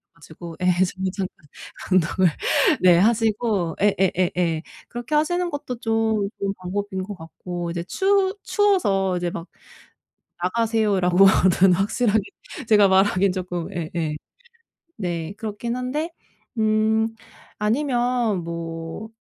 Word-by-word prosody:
가지고 165 Hz, +1 st, -11 dB
예 -, -, 0 dB
잠 180 Hz, +1 st, +1 dB, 0.2 s
잠깐 185 Hz, -6 st, -6 dB, 0.5 s
운동을 185 Hz, +1 st, +3 dB, 0.5 s
네 180 Hz, -2 st, +6 dB
하시고 215 Hz, -5 st, +1 dB
예예예예. 180 Hz, -4 st, +1 dB, 0.3 s
그렇게 240 Hz, +5 st, -4 dB
하시는 350 Hz, +4 st, +1 dB
것도 270 Hz, -5 st, -5 dB
좀 225 Hz, -3 st, 0 dB
좋은 195 Hz, 0 st, -1 dB
방법인 190 Hz, +1 st, -4 dB
것 205 Hz, +2 st, -7 dB
같고 175 Hz, +1 st, -6 dB
이제 170 Hz, 0 st, -3 dB
추 390 Hz, -, +1 dB
추워서 205 Hz, -, +2 dB
이제 175 Hz, 0 st, -1 dB
막 170 Hz, +1 st, -7 dB, 1.0 s
"나가세요." 220 Hz, 0 st, +1 dB
라고는 185 Hz, 0 st, +5 dB
확실하게 210 Hz, +3 st, +1 dB, 0.5 s
제가 210 Hz, -2 st, +6 dB
말하기엔 190 Hz, 0 st, +3 dB
쪼끔 180 Hz, -2 st, -4 dB
예예. 160 Hz, -2 st, -3 dB, 0.8 s
네 175 Hz, -2 st, -4 dB
그렇긴 225 Hz, +2 st, -4 dB
한데 295 Hz, +7 st, -3 dB, 0.5 s
음 220 Hz, +1 st, +2 dB, 0.5 s
아니면 240 Hz, -, 0 dB
뭐 165 Hz, +4 st, -6 dB
195 Hz, 235 characters per minute, -23 LUFS, 180-225 Hz, 1.0 s, 네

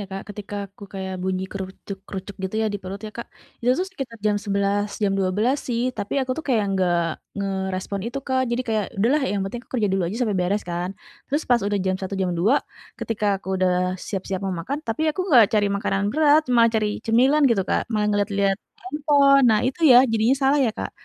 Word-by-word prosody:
ya, 200 Hz, -, -5 dB
Kak, 195 Hz, -, -4 dB
ketika 205 Hz, 0 st, -8 dB, 0.2 s
aku 200 Hz, +1 st, -12 dB
kayak 190 Hz, -1 st, -4 dB
bunyi 185 Hz, 0 st, -1 dB
krucuk-krucuk 195 Hz, 0 st, -7 dB
gitu 190 Hz, +3 st, -4 dB
ya -, -, +1 dB
di -, -, -2 dB
perut 190 Hz, +2 st, -6 dB
ya, -, -, -7 dB
Kak, 235 Hz, -, -6 dB, 0.3 s
itu 245 Hz, -, +1 dB
tuh 370 Hz, -, 0 dB
sekitar 270 Hz, -10 st, -7 dB
jam 210 Hz, -1 st, +2 dB
11, 200 Hz, 0 st, 0 dB, 0.2 s
jam 200 Hz, -1 st, +2 dB
12 210 Hz, +9 st, +1 dB
sih, 235 Hz, -1 st, 0 dB, 0.2 s
tapi 200 Hz, -, -3 dB
aku 255 Hz, -, -2 dB
tuh 320 Hz, -, -5 dB
kayak 225 Hz, -5 st, +2 dB
nggak 180 Hz, -2 st, +2 dB, 0.4 s
ngerespon 190 Hz, 0 st, -3 dB
itu, 275 Hz, +4 st, -3 dB
Kak. 260 Hz, -1 st, +1 dB
Jadi 240 Hz, +2 st, 0 dB
kayak, 215 Hz, -2 st, +1 dB
"Udahlah 265 Hz, +8 st, +3 dB
yang 205 Hz, -, -1 dB
penting 235 Hz, +5 st, -5 dB
aku -, -, -41 dB
kerja 215 Hz, -4 st, +1 dB
dulu 190 Hz, 0 st, +1 dB
aja 200 Hz, +6 st, -4 dB
sampe 215 Hz, -4 st, 0 dB
beres," 190 Hz, +4 st, 0 dB
kan. 175 Hz, +1 st, -2 dB, 0.4 s
Terus 290 Hz, +3 st, -1 dB
pas 240 Hz, -2 st, +5 dB
udah 205 Hz, -1 st, 0 dB
jam 185 Hz, -, +1 dB
1, 190 Hz, +1 st, -5 dB
jam 180 Hz, -, 0 dB
2, 215 Hz, +11 st, +3 dB, 0.4 s
ketika 215 Hz, -2 st, -2 dB, 0.2 s
aku -, -, -10 dB
udah 185 Hz, 0 st, +1 dB
siap-siap 195 Hz, -1 st, -3 dB
mau 190 Hz, -1 st, -1 dB
makan, 275 Hz, -, -3 dB
tapi 225 Hz, +7 st, -2 dB
aku 305 Hz, -, -4 dB
enggak 255 Hz, -, +7 dB
cari 205 Hz, -, +2 dB
makanan 200 Hz, -1 st, -1 dB
berat, 305 Hz, +1 st, +5 dB
malah 230 Hz, -1 st, +5 dB
cari 215 Hz, -1 st, +2 dB, 0.2 s
cemilan 260 Hz, +7 st, +4 dB
gitu, 200 Hz, -5 st, +2 dB
Kak, -, -, -1 dB
malah 210 Hz, -2 st, +1 dB
ngeliat-liat 200 Hz, -1 st, +1 dB, 0.2 s
handphone. 280 Hz, 0 st, +3 dB
Nah 215 Hz, -1 st, +3 dB
itu 265 Hz, +6 st, -3 dB
ya, 245 Hz, -, +9 dB
jadinya 225 Hz, +3 st, +2 dB
salah 275 Hz, +2 st, +4 dB
ya, -, -, +1 dB
Kak? -, -, -5 dB
205 Hz, 215 wpm, -23 LUFS, 195-245 Hz, 0.4 s, ya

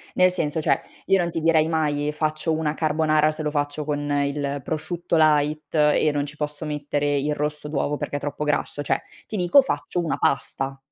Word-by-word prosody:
Nel 185 Hz, 0 st, +5 dB
senso, 160 Hz, -3 st, -1 dB
cioè, -, -, +2 dB, 0.3 s
io 195 Hz, -, +4 dB
non 175 Hz, -1 st, 0 dB
ti 165 Hz, -1 st, -3 dB
direi 160 Hz, -1 st, +4 dB
mai, 150 Hz, -3 st, 0 dB
ehm, 150 Hz, -, 0 dB
faccio 155 Hz, +1 st, -1 dB
una 155 Hz, -1 st, 0 dB
carbonara 155 Hz, -1 st, +2 dB
se 155 Hz, 0 st, -6 dB
lo 150 Hz, -, -1 dB
faccio 145 Hz, 0 st, -1 dB
con 145 Hz, 0 st, -2 dB
il 145 Hz, -1 st, -1 dB
prosciutto 170 Hz, +2 st, -2 dB
light 150 Hz, 0 st, +2 dB
e 150 Hz, 0 st, +4 dB
non 145 Hz, -1 st, 0 dB
ci 150 Hz, +1 st, -9 dB
posso 150 Hz, 0 st, -4 dB
mettere 145 Hz, -1 st, -1 dB
il 150 Hz, +2 st, 0 dB
rosso 150 Hz, 0 st, -3 dB
d'uovo 145 Hz, 0 st, -1 dB
perché 145 Hz, -, -4 dB
è -, -, -5 dB
troppo 150 Hz, +1 st, -3 dB
grasso, 145 Hz, 0 st, -1 dB
cioè -, -, 0 dB, 0.3 s
ti 215 Hz, -, -5 dB
dico 180 Hz, +8 st, +5 dB
faccio 160 Hz, -, -2 dB
una 165 Hz, -, -1 dB
pasta. 135 Hz, 0 st, -1 dB
150 Hz, 205 wpm, -24 LUFS, 145-160 Hz, 0.3 s, Nel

